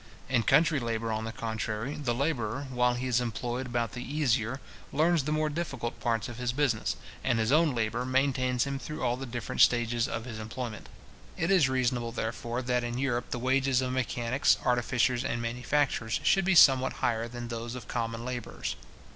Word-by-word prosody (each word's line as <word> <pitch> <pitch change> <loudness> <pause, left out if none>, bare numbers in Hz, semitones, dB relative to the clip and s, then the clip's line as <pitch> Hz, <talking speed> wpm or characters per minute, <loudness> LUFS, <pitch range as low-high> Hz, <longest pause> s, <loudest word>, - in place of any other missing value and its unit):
In 125 -3 +3
country 150 +6 +4
labour, 115 -2 -2
on 110 0 -2
the 115 - -4
contrary, 110 +2 -3
the 125 -6 -2
labourer, 135 -2 -1
while 125 -1 +2
he 125 +1 -3
is 125 -1 +2
employed 120 +2 -3
about 120 -2 -1
the 125 - -6
easier, 130 -4 0 0.3
learns 160 0 +2
the 150 - -1
more 155 0 +1
difficult 145 -7 -4
parts 115 -2 0
of 120 0 -8
his 125 -1 0
business, 130 -5 0 0.3
and 120 -3 +2
his 110 +2 +1
own 155 -2 +4
labour 115 +1 -1
maintains 130 -1 +1
him 140 -1 -3
through 150 +2 -6
all 120 - +2
the 135 +1 -6
different 120 -2 -2
stages 120 -1 +4
of 115 - -4
his 115 -3 -6
employment. 110 0 -6 0.5
It 165 +3 0
is 170 -9 +5
reasonable, 125 -2 0
therefore, 115 +2 -3
that 125 0 0
in 120 0 -3
Europe 125 -2 -1
the - - -2
wages 130 +1 +2
of 130 -1 -1
mechanics, 125 0 +1
artificers, 125 0 +2
and 120 - -1
manufacturers, 120 0 0
should 195 -2 +3
be 190 0 +3
somewhat 130 -5 +7
higher 115 -1 -1
than 120 0 -7
those 115 +1 -5
of 125 - -8
common 115 -1 -3
labourers. 125 - -4
125 Hz, 190 wpm, -29 LUFS, 115-135 Hz, 0.5 s, somewhat